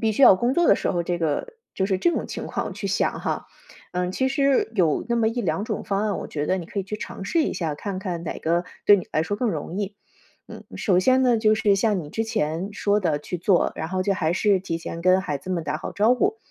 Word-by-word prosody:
必 220 -1 +2
须 245 +6 0
要 - - +10
工 245 +6 0
作 345 -1 +3
的 - - +7
时 - - -1
候 175 -2 0
这 175 0 -2
个 160 -3 -1 0.3
就 190 - 0
是 190 -1 0
这 345 - +3
种 - - -2
情 - - -6
况 - - -3
去 200 +1 -5
想 195 - 0
哈。 - - -2 0.5
嗯， 180 0 -1
其 260 +7 0
实 275 -3 +2
有 170 -7 +2
那 235 - 0
么 225 -1 +3
1-2 225 -3 -2
种 - - -3
方 200 -2 -1
案， 210 -2 0
我 - - -5
觉 150 0 -3
得 185 - +1
你 175 - -5
可 200 +4 -6
以 - - -3
去 210 +3 -5
尝 195 -2 -7
试 330 -2 +2
一 - - -1
下， 160 -4 -2
看 195 +4 -5
看 180 -4 -4
哪 165 - -5
个 170 +2 0 0.2
对 205 - +8
你 185 - -5
来 155 - +2
说 205 +5 -2
更 240 0 0
容 165 +2 -5
易。 205 0 -3 0.5
嗯， - - -10
首 185 -4 +2
先 260 +6 +4
呢， 240 -3 +4
就 215 -1 +3
是 210 -2 +3
像 205 0 +1
你 150 - -8
之 225 +8 -2
前 190 -5 -2
说 205 0 +1
的 160 -6 0
去 165 +4 -5
做， 180 +1 +2
然 160 - -4
后 185 +1 -2
就 200 -1 +2
还 160 -2 0
是 195 +1 +2
提 165 -3 -3
前 165 0 -6
跟 185 +1 +4
孩 150 -7 -3
子 185 +7 -8
们 170 -3 -1
打 150 +1 -2
好 - - -6
招 220 +5 +3
呼。 400 - +1
195 Hz, 285 characters per minute, -24 LUFS, 170-220 Hz, 0.5 s, 要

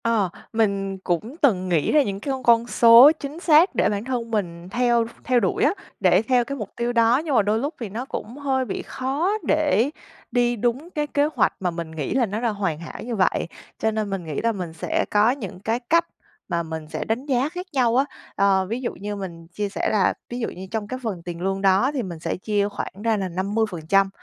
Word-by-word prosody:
Ờ, 225 -5 +2 0.2
mình 200 -3 0
cũng 205 - -2
từng 190 - +3
nghĩ 165 -4 +2
ra 300 - +5
những 195 -5 -4
cái 275 - -3
con 265 -1 -4
con 235 0 +4
số 235 +4 +8
chính 290 +3 -6
xác 330 +1 +5
để - - +3
bản 205 0 -2
thân 240 -3 -3
mình 175 -5 -3
theo 240 +1 +2 0.2
theo 250 -1 +3
đuổi 195 -5 0
á, 305 - +4 0.3
để 185 -1 +4
theo 245 +1 +2
cái 275 +3 -5
mục 210 -5 -5
tiêu 240 +1 -1
đó, 230 +1 +4
nhưng 290 -4 0
mà - - +6
đôi 210 +2 +1
lúc 285 +6 -2
thì 230 -4 -5
nó 230 +6 -5
cũng 240 -1 -6
hơi 265 -2 0
bị 210 - -4
khó 280 +8 -1 0.2
để 295 -5 +3 0.4
đi 240 -1 +2
đúng 245 +8 -1
cái 300 -4 -2
kế 290 0 +2
hoạch - - +3
mà 180 -2 -1
mình 165 -1 -6
nghĩ 155 -3 -3
là 260 -2 +3
nó 210 +2 -4
đã 240 - +1
hoàn 195 -7 -2
hảo 170 +3 -8
như 235 0 -3
vậy, 185 -4 +1 0.3
cho 220 - +1
nên 215 -1 -2
mình 195 -2 -3
nghĩ 155 -3 -3
là 230 - +2
mình 180 -6 -5
sẽ 160 - -1
có 210 +3 +4
những 215 -9 -6
cái 225 +4 -1
cách 335 +1 +4 0.4
mà 170 -2 -1
mình 160 -1 -6
sẽ - - -3
đánh 230 +5 -2
giá 270 0 +1
khác 360 +2 -6
nhau 245 -4 +2
á. 265 +2 +4 0.3
Ờ, 195 -1 +3
ví 230 +6 -4
dụ 240 - -3
như 205 +1 -5
mình 170 -4 -7
chia 205 +4 -3
sẻ - - -1
là 210 -3 +3 0.2
ví 245 - -5
dụ 225 - -2
như 190 +1 -9
trong 220 -2 -3
cái 255 +3 -5
phần 195 -7 -4
tiền 175 -1 -6
lương 195 +1 -1
đó 195 +7 +3
thì 265 -4 -1
mình 175 -5 -7
sẽ - - -2
chia 205 +1 0
khoảng - - -5
ra 225 -2 +2
là 195 -2 -2
50% 195 -1 +1
220 Hz, 240 wpm, -23 LUFS, 190-250 Hz, 0.4 s, số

